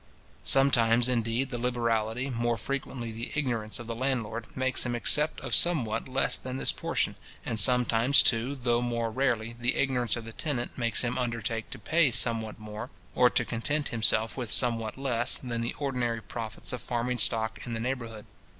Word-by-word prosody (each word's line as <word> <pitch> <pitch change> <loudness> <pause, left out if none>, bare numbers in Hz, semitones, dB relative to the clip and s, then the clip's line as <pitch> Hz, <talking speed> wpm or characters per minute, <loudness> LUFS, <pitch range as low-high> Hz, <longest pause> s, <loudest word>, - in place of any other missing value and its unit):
Sometimes, 120 -3 +5
indeed, 120 +1 0
the 120 - -4
liberality, 120 +1 -1
more 120 -1 -1
frequently 125 -1 -4
the 115 +2 -6
ignorance, 120 -7 -2
of 120 - -8
the 115 - -4
landlord, 120 -2 -2
makes 130 0 +2
him 120 -1 -2
accept 150 +6 +3
of - - -5
somewhat 125 -11 +2
less 135 +1 -1
than 130 0 -6
this - - +2
portion; - - -2 0.3
and 115 - -1
sometimes, 125 +3 +5
too, 125 +4 +1
though 120 -2 0
more 115 -2 -2
rarely, 115 -3 -1
the 120 +2 +1
ignorance 125 -4 0
of 120 -2 -7
the 115 - -9
tenant 130 -5 -3
makes 115 -1 -1
him 120 +1 -1
undertake 115 -2 -3
to - - -7
pay 160 -2 +2
somewhat 115 -2 0
more, 110 +2 -8 0.2
or 125 -1 +5
to - - 0
content 145 +6 -2
himself 110 -1 +1
with 120 -5 -4
somewhat 115 -2 +2
less, 125 -3 0
than 120 -2 -4
the 115 - -3
ordinary 125 -5 -2
profits 110 +4 -6
of 125 - -5
farming 120 0 -2
stock 110 0 +2
in 120 - -5
the 110 - -3
neighbourhood. 115 -3 -4
120 Hz, 175 wpm, -28 LUFS, 115-130 Hz, 0.3 s, Sometimes